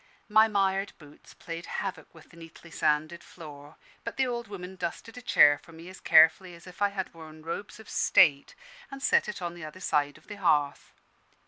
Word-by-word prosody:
My 215 +1 +5
mired 195 -1 0
boots 150 -2 -17
played 165 0 -8
havoc - - -5
with 160 -1 -18
the - - -17
neatly 165 0 -14
sanded 155 +2 -1
floor; 150 -3 -13 0.3
but 230 - -6
the 265 - +2
old 240 -2 -4
woman 190 -2 -8
dusted 185 +5 -6
a 250 - -9
chair 145 -11 +5
for 165 - -17
me 165 +2 -12
as 185 - -12
carefully 165 +3 +4
as 170 - -16
if 180 +1 -14
I 205 - +3
had 195 -2 -5
worn 155 -1 -13
robes 200 +6 -6
of 220 - -14
state, 140 -5 +3 0.3
and 275 0 -9
set - - +2
it 200 -3 -6
on 170 -1 -4
the 175 -1 -11
other 155 +4 -9
side 145 -5 -1
of 155 - -22
the 205 - -9
hearth. 150 -7 0
170 Hz, 205 wpm, -28 LUFS, 155-200 Hz, 0.3 s, My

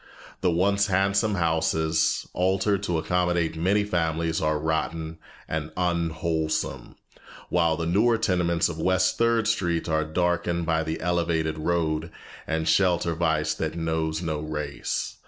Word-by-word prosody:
The 90 - +2
once 100 +4 +2
handsome 100 +2 +2
houses, 80 -2 +1
altered 95 +2 +1
to 90 -4 -1
accommodate 85 0 0
many 95 +6 +2
families, 80 -4 -1
are 75 0 +1
rotten 80 +1 -2 0.3
and 80 -1 -3
unwholesome, 85 -2 -1 0.5
while 85 -2 +2
the 85 - -2
newer 110 +7 +3
tenements 90 -5 +1
of 80 -2 -6
West 95 +2 +1
Third 115 -2 +2
Street 85 -5 0
are 80 -1 +1
darkened 85 +1 0
by 80 -1 +1
the 80 +1 -3
elevated 80 -2 0
road, 80 -1 0 0.4
and 80 0 -1
shelter 85 0 +2
vice 80 -2 0
that 80 0 -3
knows 80 0 -1
no 80 -3 -2
race. 75 -2 -4
85 Hz, 135 wpm, -25 LUFS, 80-90 Hz, 0.5 s, newer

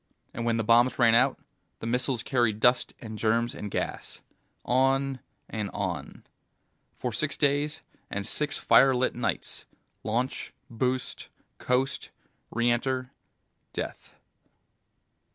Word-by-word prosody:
And 115 - -3
when 115 -1 +2
the 115 - 0
bombs 120 +3 +4
ran 115 -2 +5
out, 125 +3 +4 0.4
the - - -8
missiles 125 +1 0
carried 120 -5 +1
dust 125 +2 +3
and 110 -2 -7
germs 115 +2 +1
and 105 - -6
gas. - - -4 0.4
On 135 +1 +2 0.3
and 105 -3 -3
on. 95 -4 -4 0.7
For 125 -2 -3
six 155 +7 -1
days 145 +2 +1 0.3
and 100 0 -3
six 150 +5 -1
firelit 130 -1 +4
nights. 120 - -3 0.4
Launch, 120 +4 -2 0.2
boost, 125 +2 -2 0.3
coast, 130 +2 0 0.4
re 120 +1 +2
enter, 130 +1 -1 0.6
death. - - -6
125 Hz, 115 wpm, -28 LUFS, 115-130 Hz, 0.7 s, ran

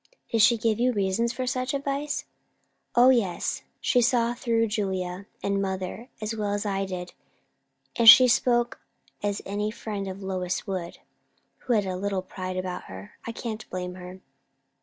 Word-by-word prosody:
"Did 225 - +3
she 235 +2 +6
give 225 0 0 0.2
reasons 200 +4 +1
for 255 +1 -3
such 255 +1 -1
advice?" 280 +1 -2 0.7
"O 250 +2 +7
yes! 210 -9 0 0.2
She 250 - +3
saw 240 -1 +2
through 230 -2 +1
Julia 190 -3 -3 0.2
and 200 0 0
mother 190 +5 -4
as 215 +1 -3
well 205 -2 -1
as 205 +1 -2
I 195 -1 -1
did; 180 -2 -6 0.8
and 230 -1 +8
she 255 +4 +11
spoke 240 0 +2 0.4
as 205 -1 -2
any 205 +2 -2
friend 210 -3 -5
of 190 +1 -7
Lois 185 -1 -2
would, 185 -4 -4 0.6
who 250 - -1
had 210 -3 +2
a 185 -1 -2
little 195 -1 -2
pride 185 0 -5
about 185 -1 -4
her. 95 +1 -10 0.2
I - - -2
can't 225 -2 -6
blame 180 0 -4
her." 180 +1 -10
205 Hz, 160 wpm, -26 LUFS, 185-235 Hz, 0.8 s, she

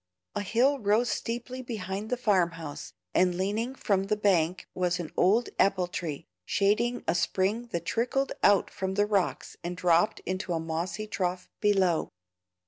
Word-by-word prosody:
A - - -2
hill 250 +8 +2
rose 220 +3 +2
steeply 245 +2 -4
behind 210 -3 -4
the 250 - 0
farm 190 -8 +2
house, 160 -3 -7 0.2
and 180 -1 +3
leaning 215 +7 -1
from 195 -6 +1
the 210 +2 +1
bank 185 -4 +2
was 180 0 0
an 165 -3 -5
old 215 +7 +3
apple 195 -2 +3
tree, 175 -5 -5 0.2
shading 215 - +1
a - - +3
spring 195 +6 0
that 170 -7 -4
trickled 245 +8 0
out 200 -2 +4
from 190 0 -3
the 205 +1 +3
rocks 200 -4 -1
and 175 +1 -4
dropped 175 +2 +3
into 185 0 -3
a 165 - 0
mossy 170 +6 -3
trough 180 -3 -3
below. 190 -5 +2
195 Hz, 160 wpm, -28 LUFS, 180-220 Hz, 0.2 s, out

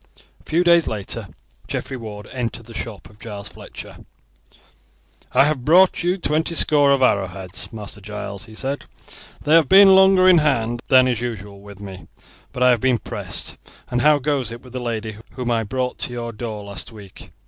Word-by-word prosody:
A - - -21
few 170 +3 +2
days 170 -2 +4
later 105 -3 -3 0.4
Geoffrey 135 - -4
Ward 105 -4 -8
entered 120 -2 -4
the 115 - -12
shop 110 -3 -7
of 105 +2 -20
Giles 100 -3 -8
Fletcher. - - -11 1.3
"I - - +5
have 145 -3 0
brought 180 +6 +5
you 180 +2 0
twenty 160 -1 -1
score 145 -3 +3
of 135 -1 +3
arrowheads, 95 -4 -1
Master 105 -1 -7
Giles," 105 +1 -7
he 110 -1 -14
said. 135 +4 -4 0.6
"They 150 - +2
have 160 -4 +5
been 195 0 +8
longer 190 -1 +6
in 180 -2 +7
hand 120 -6 0
than 130 -2 +6
is 120 -3 -1
usual 105 -4 -6
with 100 -1 -13
me, 95 -4 -10 0.4
but 125 - -1
I 125 - +6
have 120 -3 +1
been 130 -2 +3
pressed. - - -5 0.3
And 125 0 +1
how 150 0 +5
goes 135 -4 -1
it 120 0 -9
with 125 -1 -14
the 130 - -3
lady 110 -3 -4 0.2
whom 120 0 -3
I 115 -1 +1
brought 125 +3 -3
to 120 - -2
your 120 -1 -4
door 110 -1 -6
last 100 +2 -7
week?" 100 -4 -13
120 Hz, 190 wpm, -21 LUFS, 105-145 Hz, 1.3 s, been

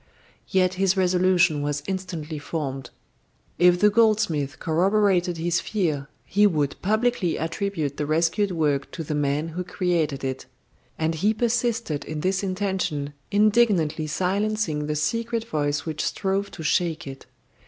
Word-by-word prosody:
Yet 185 -1 +2
his 195 0 +3
resolution 180 -4 +3
was 145 0 -2
instantly 175 -5 -4
formed. 135 -5 -4 0.7
If 180 0 +5
the 210 +1 +5
goldsmith 205 -10 +2
corroborated 180 +1 +2
his 170 +1 0
fear, 155 -9 -2 0.2
he 205 +2 +4
would 150 -7 -1
publicly 215 -3 +1
attribute 165 -3 -2
the 150 - -2
rescued 165 +6 +1
work 150 -5 0
to 165 - -4
the 155 - -4
man 145 +2 0
who 175 +3 -4
created 170 -7 -1
it. 130 -1 -4 0.5
And 160 0 0
he 205 +7 +1
persisted 230 - 0
in 155 -1 -5
this 190 +2 0
intention, 185 -7 -2 0.2
indignantly 205 -7 +3
silencing 185 -2 -1
the 150 - -1
secret 230 +9 -1
voice 145 -3 -1
which 160 -2 -3
strove 195 0 -1
to 160 - -9
shake 170 +1 0
it. 135 -2 -9
175 Hz, 140 wpm, -24 LUFS, 150-200 Hz, 0.7 s, If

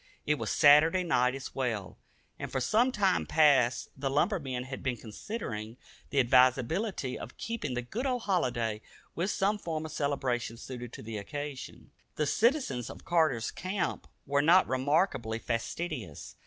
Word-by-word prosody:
It 150 -1 +1
was - - -3
Saturday 155 +5 +6
night 125 -7 +2
as 135 - -7
well; 115 -8 -2 0.4
and - - -5
for 130 - -1
some 230 - +2
time 200 -6 +1
past 135 -6 +3
the 135 0 -2
lumbermen 140 -4 0
had 130 +1 -7
been 130 -3 -2
considering 110 - -6 0.3
the 140 - +1
advisability 130 - +2
of - - -9
keeping 230 - -4
the 125 - -2
good 230 - -3
old 250 -3 -1
holiday 120 - 0 0.3
with 180 +4 -1
some 205 +1 +1
form 160 -4 -3
of 155 - -7
celebration 135 -6 -1
suited 120 -1 -8
to - - -9
the 110 0 -5
occasion. 145 +4 -7 0.2
The 150 - 0
citizens 230 - +1
of - - -11
Carter's 155 -10 +2
Camp 185 +2 -3 0.2
were 140 +1 +2
not 175 +5 +5
remarkably 130 - +1
fastidious. 115 - -4
140 Hz, 155 wpm, -30 LUFS, 125-175 Hz, 0.4 s, Saturday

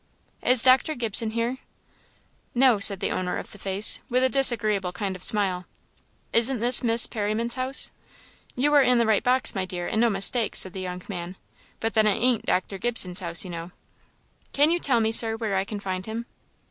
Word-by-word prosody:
"Is 250 -2 +5
Dr. 260 +4 +3
Gibson 225 -1 0
here?" 235 +3 -3 1.0
"No," 245 -3 +3
said 200 -1 +6
the - - -2
owner 180 -1 -3
of - - -9
the 205 - -11
face, 195 +2 -1
with 255 +1 0
a 260 - +2
disagreeable 215 -8 +3
kind 190 +1 -5
of 185 - -12
smile. 185 -3 -1 0.7
"Isn't 235 +2 +3
this 240 +2 +5
Miss 230 -1 +4
Perriman's 220 +2 -2
house?" 260 +1 -1 0.6
"You 290 +4 0
are 290 - +5
in 250 -2 +2
the 235 - +1
right 220 -2 +1
box, 255 +1 +1
my 195 - -3
dear, 180 -1 -6
and 220 - -2
no 235 - +3
mistake," 210 +3 -1
said 185 - +3
the 190 - -7
young 180 -1 -7
man; 180 -2 -7 0.4
"but 225 0 -3
then 220 -1 +2
it 210 - +1
ain't 245 -1 0
Dr. 190 +1 -2
Gibson's 185 -6 0
house, 170 -2 +1
you 180 - -8
know." 170 0 -8 0.8
"Can 290 +3 +3
you 345 - 0
tell 250 -8 0
me, 220 0 0
Sir, 225 0 0
where 220 -4 -3
I 190 - 0
can 205 +1 -7
find 185 -2 -5
him?" 225 +3 -6
220 Hz, 200 wpm, -24 LUFS, 190-245 Hz, 1.0 s, said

